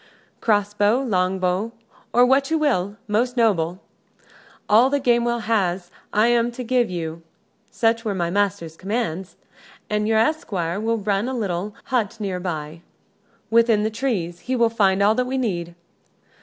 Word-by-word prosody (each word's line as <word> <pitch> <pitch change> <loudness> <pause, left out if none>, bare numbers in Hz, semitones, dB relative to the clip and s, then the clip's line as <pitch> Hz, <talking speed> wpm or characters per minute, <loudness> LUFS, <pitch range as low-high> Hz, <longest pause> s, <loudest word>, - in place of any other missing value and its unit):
"Cross 205 -2 +1
bow, 210 +4 +3
longbow, 185 -1 0 0.4
or 245 +1 +5
what 270 +2 +3
you 320 - +2
will, 210 - 0
most 240 +4 0
noble. 185 -6 +1 0.9
All 230 +5 +5
that 285 -1 -1
Gamewell 235 -1 +2
has 190 -5 0 0.2
I 215 +2 +3
am 240 0 +2
to 250 - -6
give 245 -1 +1
you. 165 -2 -5 0.5
Such 230 0 +1
were 210 -4 -2
my 170 -2 -1
master's 195 -5 -1
commands. 190 -2 -3 0.6
An 210 0 0
your 220 0 +2
esquire 205 - 0
will 230 +1 0
run 205 +1 -1
to 260 - -3
the - - -3
little 200 -1 -3
hut 230 -4 -1
near 195 -3 -3
by, 160 -3 -5 0.7
within 230 -2 +4
the 220 - 0
trees, 210 -8 -2
he 255 - -3
will 235 -2 +3
find 200 -3 +2
all 210 +2 +5
that 250 +2 -1
we 265 +1 -2
need." 175 -9 -2
210 Hz, 160 wpm, -22 LUFS, 185-235 Hz, 0.9 s, or